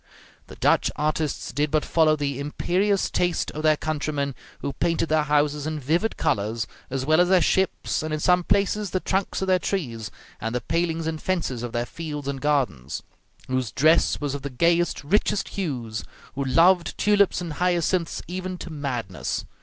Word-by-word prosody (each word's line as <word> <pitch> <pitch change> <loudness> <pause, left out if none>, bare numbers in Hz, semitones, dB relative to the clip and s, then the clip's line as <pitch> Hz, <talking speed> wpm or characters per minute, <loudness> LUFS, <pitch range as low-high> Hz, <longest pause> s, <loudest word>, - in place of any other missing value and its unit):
The - - -11
Dutch - - +3
artists 155 0 -1
did 145 +1 +1
but 155 0 +1
follow 155 -2 +4
the 140 -2 -2
imperious 185 +7 +1
taste 175 -2 0
of 155 - -5
their 155 -1 +4
countrymen, 145 -2 -2 0.3
who 140 - -3
painted 165 +1 0
their 155 0 +3
houses 150 0 +1
in 155 -1 -3
vivid 165 - 0
colors, 110 +2 0 0.2
as 130 0 -2
well 155 +3 +5
as 180 - +3
their 185 -1 +6
ships, 190 +2 +1
and 155 0 -4
in 155 - -1
some 180 +3 +3
places 200 +2 +1
the 185 - 0
trunks 190 +1 -1
of - - -2
their 185 -1 +4
trees 120 - -3 0.3
and 115 +2 -3
the 125 - 0
palings 165 +4 -1
and 160 -1 -3
fences 170 -10 -1
of 120 -1 -4
their 120 +1 -1
fields 150 -1 -6
and 140 -1 -3
gardens; 130 - 0 0.4
whose 130 -3 -1
dress 155 +6 +3
was 145 -2 -2
of 140 - -4
the 140 - -4
gayest, 170 +6 +1
richest 200 +5 +1
hues; 120 - -3 0.3
who 140 - -2
loved 170 +6 +4
tulips 205 -3 +3
and 170 -3 -4
hyacinths 175 0 0
even 185 +1 -4
to 175 - -8
madness. 125 - -3
155 Hz, 180 wpm, -25 LUFS, 140-175 Hz, 0.4 s, their